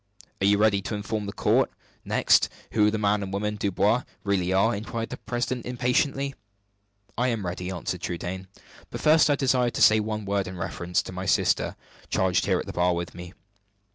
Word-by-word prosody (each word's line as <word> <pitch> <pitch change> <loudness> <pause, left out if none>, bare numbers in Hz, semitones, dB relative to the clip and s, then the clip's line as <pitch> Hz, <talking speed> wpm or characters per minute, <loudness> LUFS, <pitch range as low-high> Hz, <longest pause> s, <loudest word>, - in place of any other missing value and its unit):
"Are 95 - +3
you 100 0 +5
ready 105 -2 +3
to 105 - -4
inform 105 0 -3
the - - -3
court, - - +2 0.3
next, - - +3 0.2
who 105 -1 +4
the 110 - -1
man 105 0 +1
and 95 -1 -5
woman 105 +2 -2
Dubois 105 +3 +1 0.2
really 95 -2 0
are?" 100 +5 +3
inquired 115 +2 -5
the - - -5
president, 120 0 -3
impatiently. 125 +3 0 0.9
"I 125 - +2
am 115 -6 -1
ready," 90 +1 -4
answered 90 -3 -4
Trudaine. 90 +2 -4 0.4
"But - - -6
first 155 0 +5
I 145 - +4
desire 130 -3 +2
to 120 - -4
say 110 0 +7
one 110 -1 -3
word 100 -1 -1
in 90 0 -7
reference 90 0 -2
to - - -8
my 95 +1 -5
sister, - - +2 0.3
charged 95 0 +1
here 95 -2 +3
at - - -5
the - - -7
bar 90 0 +2
with 85 0 -4
me." 90 0 -10
105 Hz, 195 wpm, -26 LUFS, 95-115 Hz, 0.9 s, say